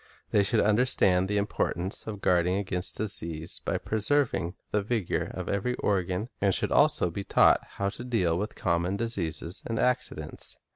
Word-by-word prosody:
They 105 Hz, -, +4 dB
should 105 Hz, +3 st, +3 dB
understand 105 Hz, -4 st, +3 dB
the 105 Hz, +1 st, 0 dB
importance 95 Hz, -2 st, -2 dB
of 105 Hz, -2 st, -5 dB
guarding 90 Hz, 0 st, +2 dB
against 90 Hz, -2 st, -2 dB
disease 85 Hz, -6 st, -2 dB
by -, -, 0 dB
preserving 110 Hz, -5 st, 0 dB, 0.2 s
the 105 Hz, -, +2 dB
vigor 105 Hz, -3 st, -1 dB
of -, -, -5 dB
ever)' 115 Hz, +5 st, -1 dB
organ, 95 Hz, +2 st, -1 dB
and 100 Hz, -2 st, +3 dB
should -, -, -1 dB
also 90 Hz, -, +4 dB
be 100 Hz, +4 st, -4 dB
taught 100 Hz, -, +4 dB
how 100 Hz, 0 st, -1 dB
to 115 Hz, -, -8 dB
deal 95 Hz, -10 st, +1 dB
with 105 Hz, +5 st, -3 dB
common 85 Hz, +2 st, 0 dB
diseases 95 Hz, -5 st, -4 dB
and 115 Hz, -, -2 dB
accidents. 110 Hz, -12 st, -1 dB
100 Hz, 160 wpm, -28 LUFS, 90-110 Hz, 0.2 s, They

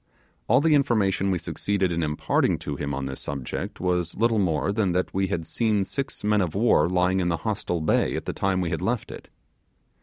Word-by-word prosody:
All 125 Hz, +5 st, +4 dB
the 160 Hz, 0 st, +3 dB
information 105 Hz, -9 st, +2 dB
we 95 Hz, -, +1 dB
succeeded 90 Hz, +3 st, -1 dB
in 85 Hz, 0 st, -1 dB
imparting 75 Hz, -1 st, +1 dB
to 75 Hz, -, -3 dB
him 70 Hz, +1 st, -3 dB
on 70 Hz, -1 st, -3 dB
this 65 Hz, 0 st, -5 dB
subject 70 Hz, -3 st, -5 dB
was 90 Hz, -2 st, -1 dB
little 115 Hz, 0 st, +2 dB
more 90 Hz, 0 st, +1 dB
than 100 Hz, -4 st, 0 dB
that 90 Hz, +1 st, -1 dB
we 95 Hz, 0 st, +1 dB
had 85 Hz, -4 st, -3 dB
seen 110 Hz, -1 st, +1 dB
six 135 Hz, +7 st, -4 dB
men 105 Hz, 0 st, +3 dB
of 90 Hz, -2 st, -2 dB
war 100 Hz, -7 st, +3 dB
lying 90 Hz, +1 st, +2 dB
in 90 Hz, -1 st, +1 dB
the 85 Hz, -, 0 dB
hostile 100 Hz, -6 st, -1 dB
bay 80 Hz, -, +1 dB
at -, -, -4 dB
the -, -, -3 dB
time 95 Hz, -1 st, 0 dB
we 85 Hz, -2 st, -2 dB
had 80 Hz, -, -2 dB
left -, -, -2 dB
it. -, -, -10 dB
95 Hz, 215 wpm, -25 LUFS, 85-105 Hz, -, All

